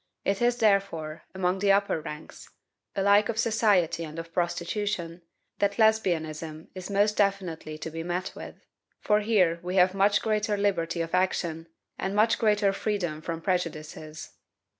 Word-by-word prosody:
It 195 +2 0
is, 240 0 +2
therefore, 195 -8 0
among 185 0 0
the 200 0 +3
upper 200 -5 +2
ranks, 150 0 -9 0.5
alike 200 +2 +4
of 225 - -2
society 205 -7 +2
and 155 0 -8
of 165 0 -7
prostitution, 175 0 -2 0.4
that 200 0 +1
Lesbianism 160 -8 0
is 185 0 -7
most 205 +1 +2
definitely 185 -6 -1
to 160 +1 -6
be 165 +1 -5
met 175 +3 -3
with, - - -10 0.3
for 210 0 +2
here 195 -6 +2
we 180 +1 -4
have 185 0 +5
much 200 +1 +3
greater 210 -1 0
liberty 170 -4 0
of 165 0 -4
action, 170 -3 0 0.3
and 195 +1 -2
much 220 +2 +3
greater 210 -3 +3
freedom 180 -7 -2
from 165 0 -4
prejudices." 155 -3 -4
185 Hz, 150 wpm, -27 LUFS, 165-205 Hz, 0.5 s, have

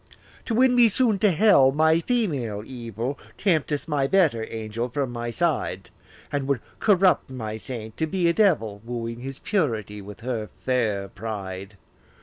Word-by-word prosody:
To 230 - -1
win 255 +1 +5
me 240 -2 +6
soon 220 -2 +2
to 210 - +4
hell, 175 -8 +5
my 160 +3 +3
female 145 - -1
evil 120 +1 -5 0.2
Tempteth 155 -7 0
my 145 -3 +1
better 140 -11 +2
angel 115 +2 -4
from 135 0 -2
my 120 0 -4
side, 125 - -1 0.4
And 140 -2 -1
would 140 -3 +1 0.2
corrupt 190 -7 +3
my 110 -4 -5
saint 110 -2 -7
to 160 - 0
be 180 0 +1
a 170 - +3
devil, 145 - +2
Wooing 115 0 -5
his 135 +2 -6
purity 110 - -1
with 105 +2 -11
her 115 -4 -3 0.2
fair 110 -6 0
pride. 100 -1 -6
130 Hz, 155 wpm, -25 LUFS, 110-170 Hz, 0.4 s, me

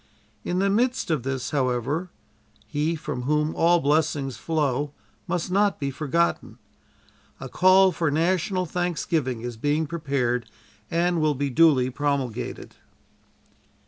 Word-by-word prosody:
In 180 - -2
the 195 +1 +2
midst 245 -2 +1
of 155 -5 +1
this, 135 0 -3
however, 135 +5 -1 0.6
He 155 +3 -1
from 145 -4 -5
whom 150 +4 0
all 175 +1 +4
blessings 145 -3 0
flow 145 +1 -1 0.3
must 180 0 -2
not 200 +1 +2
be 140 -2 -2
forgotten. 160 +5 -1 0.8
A - - -6
call 185 +1 +5
for 165 -3 0
national 185 +4 0
thanksgiving 165 -8 -2
is 120 -1 -6
being 145 +6 0
prepared 135 -7 -2 0.4
and 170 0 +1
will 155 -1 +2
be 140 +1 -2
duly 130 -3 +4
promulgated." 140 -4 -3
150 Hz, 125 wpm, -25 LUFS, 135-170 Hz, 0.8 s, call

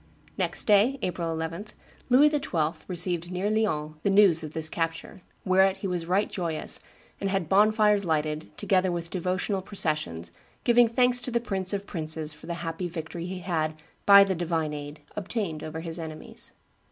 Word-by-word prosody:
Next - - 0
day, 215 +6 +4
April 170 -2 -2
11, 165 +5 -4 0.4
Louis 285 +4 +6
XII. 165 - -1
received 175 -1 0
near 185 +3 -1
Lyons 155 -9 -1
the 200 - +1
news 195 -5 +5
of 155 0 -7
this 160 -1 -1
capture, 165 +3 -4 0.2
"whereat 190 0 +4
he 195 - -4
was 175 -3 -3
right 190 +4 +2
joyous, 165 -4 -3 0.4
and 195 - -1
had 190 -4 -1
bonfires 210 +2 +4
lighted, 155 -2 -1
together 185 -1 +2
with 170 -1 -4
devotional 185 +2 -1
processions, 150 - 0 0.3
giving 240 -1 +5
thanks 245 +1 +2
to 250 - -3
the 235 -1 +1
Prince 195 -5 -2
of 200 -1 -3
princes 160 -3 -3
for 150 - -14
the 170 - -3
happy 165 +2 -3
victory 170 +1 -6
he 185 0 -5
had, 160 -3 -1 0.3
by 200 0 +10
the 195 -1 0
divine 165 -3 -1
aid, 145 +1 -7
obtained 200 -6 -3
over 155 +1 -5
his 165 0 -6
enemies." 155 -1 -6
180 Hz, 170 wpm, -27 LUFS, 160-200 Hz, 0.4 s, by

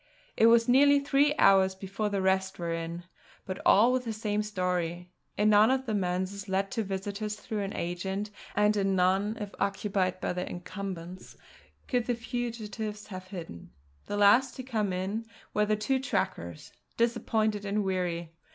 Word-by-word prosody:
It 225 - +5
was 230 0 +5
nearly 285 +3 +6
three 285 +1 +2
hours 190 -1 +5
before 195 +2 -3
the 200 -2 -1
rest 190 0 +1
were 170 -1 -2
in, 165 +1 -4 0.4
but 185 -1 -5
all 230 +5 +6
with 255 -1 0
the 230 - -3
same 210 -1 -1
story; 180 -4 -2 0.3
in 210 +1 +4
none 210 +2 +6
of 265 0 +1
the 220 - -2
manses 190 +1 -2
let 195 +1 0
to 225 - -1
visitors 200 +2 -4
through 215 0 -5
an 195 0 -4
agent, 190 +4 -3 0.2
and 210 +1 +3
in 195 -1 +1
none 190 +4 +2
if 205 -1 -6
occupied 195 -2 0
by - - -2
their 180 0 -3
incumbents, 180 -1 -7 0.5
could 245 -3 0
the 245 - +1
fugitives 225 -3 -5
have 185 -2 -8
hidden. 170 - -8 0.4
The 205 - -3
last 230 +6 +5
to 260 - -6
come 220 -6 -1
in 195 +5 -3 0.3
were 210 0 +2
the 215 - +2
two 240 +6 0
trackers, 265 - -3 0.3
disappointed 220 -3 +1
and 205 +1 0
weary. 175 -3 -2
205 Hz, 170 wpm, -29 LUFS, 185-220 Hz, 0.5 s, nearly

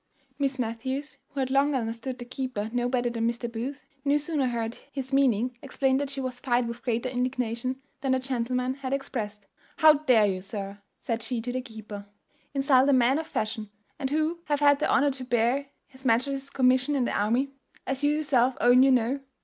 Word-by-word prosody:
Miss 275 -1 0
Matthews, 260 +4 -3
who 275 - -3
had 260 0 -1
long 280 +1 +3
understood 235 +1 -3
the 245 - -8
keeper 250 -4 -4
no 245 0 +1
better 245 -1 0
than 230 0 0
Mr. 235 +1 -3
Booth, 255 +5 -5 0.2
no 285 +1 +3
sooner 295 -2 0
heard 230 -1 -3
his 265 -1 -5
meaning 250 -3 +2
explained 270 -1 +1
than 285 - -1
she 275 0 -6
was 255 -2 -4
fired 245 -2 +1
with 235 +1 -6
greater 240 0 -1
indignation 250 0 -2 0.2
than 265 -1 +1
the - - +3
gentleman 255 0 -1
had 265 -1 -4
expressed. 215 -7 -4 0.3
"How 310 -1 +8
dare 255 -8 +4
you, 190 -2 -1
sir," 200 0 -6 0.2
said 230 -1 -2
she 245 +1 -3
to 245 +2 -3
the 255 +1 -2
keeper, 215 -4 -9 0.5
"insult 270 -1 +4
a - - +5
man 260 +3 +4
of 320 - -5
fashion, 215 -1 -3 0.3
and 265 - -1
who 310 +3 0
hath 290 -1 0
had 285 -1 +5
the 305 - +1
honour 285 +1 +4
to 265 -1 -6
bear 245 +3 +1 0.2
his 260 0 -16
majesty's 270 +3 +1
commission 260 +1 +3
in 260 -3 +2
the - - -2
army? 240 +7 +1 0.3
as 270 +1 -3
you 290 - +4
yourself 265 -4 +2
own 245 +1 +6
you 270 - +6
know. 255 +1 +2
255 Hz, 200 wpm, -27 LUFS, 235-275 Hz, 0.5 s, How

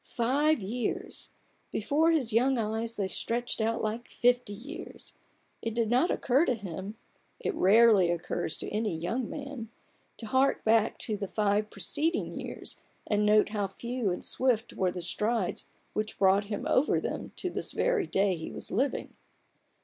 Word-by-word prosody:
Five 275 +2 +2
years! 230 +5 -2 0.4
Before 295 +9 +2
his 275 -9 +1
young 255 +3 +3
eyes 225 +1 -1
they 200 -2 -1
stretched 235 +4 -2
out 225 +1 0
like 220 +3 -3
fifty 245 -2 +2
years. 265 +11 -9 0.5
It 225 -1 -3
did 230 -1 +1
not 260 +9 +4
occur 265 +4 +2
to 250 - +1
him 195 0 -6 0.4
(it - - -2
rarely 205 -2 +5
occurs 170 -2 -2
to - - -5
any 210 -5 -1
young 220 +9 -2
man) 275 -6 -6 0.5
to 230 - -7
hark 260 +4 +2
back 220 0 +3
to 215 - -2
the 200 - -4
five 210 +1 +1
preceding 295 - 0
years - - -7 0.3
and 210 0 +1
note 210 0 +5
how 205 -2 -1
few 235 +2 -3
and 180 - -3
swift 245 -3 0
were 185 -1 +1
the 180 -1 -5
strides 210 +1 -1 0.3
which 215 0 -2
brought 195 +1 +4
him 205 0 -4
over 270 - +3
them - - -4
to 365 - -3
this - - -2
very - - +1
day 195 -1 +2
he 160 -1 -6
was - - -4
living. 265 +6 -1
225 Hz, 165 wpm, -29 LUFS, 205-250 Hz, 0.5 s, rarely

